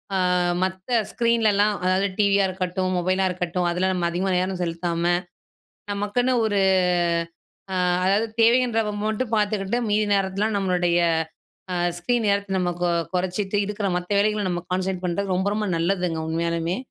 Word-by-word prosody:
அ - - +1 0.4
மத்த 185 +4 -4 0.2
ஸ்க்ரீன்லலாம், 215 -3 +2
அதாவது 185 +2 +2
டிவியா 200 -1 +4
இருக்கட்டும், 185 0 -2
மொபைலா 185 +2 +1
இருக்கட்டும், 180 0 -2
அதுல 180 +2 0
நம்ம 175 -2 0
அதிகமா 185 +3 -1
நேரம் 185 0 -1
செலுத்தாம, 170 0 -2 0.9
நமக்குன்னு 205 +5 0
ஒரு 205 -2 0 1.2
அ - - -1 0.3
அதாவது 200 +4 +2
தேவைன்றப்ப 230 -2 +3
மட்டும் 220 +2 -2
பாத்துக்கிட்டு, 210 +1 0
மீதி 210 +1 +2
நேரத்துலலாம் 195 +2 0
நம்மளுடைய 180 -3 +1 0.7
அ - - -1 0.2
ஸ்க்ரீன் 230 +6 0
நேரத்தை 200 0 0
நம்ம 180 -1 0
கொ - - +3 0.3
கொறைச்சுட்டு, 190 +2 -1
இருக்கிற 205 -1 -2
மத்த 180 +2 -6
வேலைகள 210 0 +1
நம்ம 175 -1 -2
கான்சன்ட்ரேட் 185 0 -2
பண்ணுறது 190 +2 -1
ரொம்ப 190 +2 0
ரொம்ப 210 -1 -1
நல்லதுங்க 175 -1 0
உண்மையாலுமே. 170 +2 -1
190 Hz, 140 wpm, -23 LUFS, 180-210 Hz, 1.2 s, டிவியா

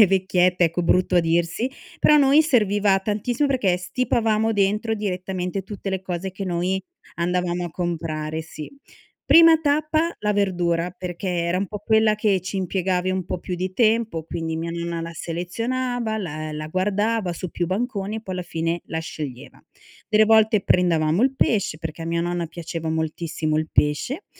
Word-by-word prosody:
le 210 - +9
vecchiette 180 -1 +2
ecco 170 +2 0
brutto 180 +2 +2
a - - +6
dirsi; 170 +9 0 0.3
però 300 - +6
a - - +7
noi 285 +2 +6
serviva 205 -8 +3
tantissimo 220 +7 -1
perché 205 -10 +2
stipavamo 225 +2 0
dentro 210 +3 +1
direttamente 185 -2 -3
tutte 195 0 -6
le 190 -1 -2
cose 185 0 -4
che 195 +1 -6
noi 180 +2 -1 0.3
andavamo 175 0 -1
a 170 - -8
comprare, 160 -2 -3
sì. 155 -1 -9 0.6
Prima 330 -1 +8
tappa 310 +3 +1
la 210 0 0
verdura, 180 -3 0
perché 180 0 -6
era 170 0 0
un 195 0 -1
po' 210 - -5
quella 220 -1 +3
che 205 -3 +2
ci 195 +2 -5
impiegavi 185 0 0
un 185 -1 -2
po' 180 - -4
più 180 +1 -5
di 185 +1 -3
tempo, 220 -6 +1
quindi 160 0 -4
mia 165 +1 -3
nonna 170 0 -3
la 165 0 -5
selezionava, 230 +8 -2
la 155 -5 -5
la 155 0 -5
guardava 205 +3 0
su 180 +1 -5
più 175 +2 -2
banconi 205 +1 -2
e 220 - -6
poi 190 -3 -5
alla 180 - -3
fine 165 0 -2
la 160 - -3
sceglieva. 145 -5 -7 0.5
Delle 215 0 +5
volte 220 -2 +4
prendevamo 170 0 +2
il 270 +1 +2
pesce- 200 -12 +1
perché 160 0 -6
a 165 - -5
mia 170 0 0
nonna 175 0 -2
piaceva 165 -1 -5
moltissimo 160 -1 -2
il 155 0 -1
pesce- 200 - 0
185 Hz, 175 wpm, -23 LUFS, 170-215 Hz, 0.6 s, le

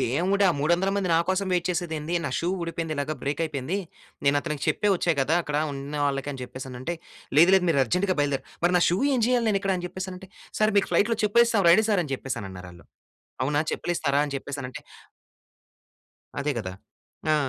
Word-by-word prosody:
"దేవుడా! 190 - +2
మూడొందల 175 +5 +2
మంది 190 -3 0
నాకోసం 190 +4 +1
వెయిట్ 175 -1 +1
చేసేది 175 -2 -2
ఏంది? 155 +3 -4
నా - - -2
షూ 170 - -1
ఊడిపోయింది. 165 -1 -3
ఇలాగ 145 +2 -2
బ్రేక్ 145 +4 -2
అయిపోయింది. 150 +3 -3 0.5
నేను 140 +1 +4
అతనికి 150 -2 -4
చెప్పే 210 - +1
వచ్చా 170 -1 +1
కదా! 150 +5 +2
అక్కడ 150 -1 -3 0.2
ఉన్నవాళ్ళకి" 140 0 -2
అని 135 - -8
చెప్పేసి 130 +1 -8
అనంటే. 130 +8 -4 0.4
"లేదు, 170 +4 +7
లేదు 190 - +4
మీరు 140 -4 +3
అర్జెంట్‌గా 185 - 0
బయలుదేర 140 -2 0 0.2
మరి 180 - +4
నా - - +2
షూ 175 +3 +1 0.2
ఎం 245 - +1
చేయాలి, 245 -1 +2
నేనిక్కడ?" 195 -1 +1
అని 180 - -5
చెప్పేసి 185 +1 -6
అనంటే, 185 +1 -10 0.3
"సర్ 215 0 +4
మీకు - - 0
ఫ్లైట్‌లో 225 +2 +3
చెప్పు 210 +3 +4
ఏశాం. 225 -4 +1
రండి 215 +6 +6
సార్" 200 -4 +3
అని 140 - -6
చెప్పేసి, 135 0 -4
అనన్నారు 95 -2 -8
ఆళ్లు. 85 - -16 0.6
"అవునా 145 +2 +1
చెప్పులిస్తారా?" 145 -5 0
అని 140 - -7
చెప్పేసి 145 +1 -6
అనంటే 125 0 -7 1.6
అదే 145 +1 0
కదా! 95 -4 -4 0.6
ఆ! - - +5
165 Hz, 190 wpm, -26 LUFS, 140-190 Hz, 1.6 s, లేదు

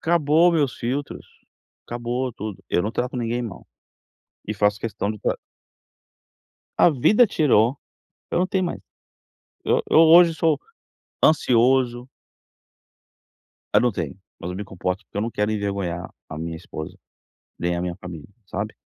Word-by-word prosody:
Acabou 165 +1 +4
meus 145 -6 +1
filtros, 135 +5 -4 0.6
acabou 120 +2 -3
tudo, 105 -2 -7
eu 90 - +1
não 105 - -1
trato 125 +1 -2
ninguém 120 0 -1
mal, 110 -7 -8 0.8
e 105 - -1
faço 105 0 +1
questão 105 -2 -2
de 105 - -9
tra - - -1 1.4
A 175 - +6
vida 210 - +4
tirou, 135 - +3 0.5
eu - - +1
não 180 - +2
tenho 190 -1 0
mais, 175 - -4 0.8
e - - -2 0.2
eu - - +6
hoje 165 +1 +7
sou 160 -1 +2 0.7
ansioso 125 -3 +3 1.7
Eu - - +6
não 125 -1 +2
tenho! 85 -5 -4 0.2
Mas 90 - -5
eu 90 - -5
me 105 - -4
comporto, 95 +1 -4
porque - - -14
eu - - +1
não 115 - -2
quero 105 0 -1
envergonhar 100 -4 -3 0.2
a 75 - -7
minha 80 0 -4
esposa, 80 -2 -8 0.6
nem 85 0 0
a 85 - -2
minha 90 -1 -3
família, 85 -5 -9 0.2
sabe? 100 +3 -4
115 Hz, 150 wpm, -23 LUFS, 95-140 Hz, 1.7 s, hoje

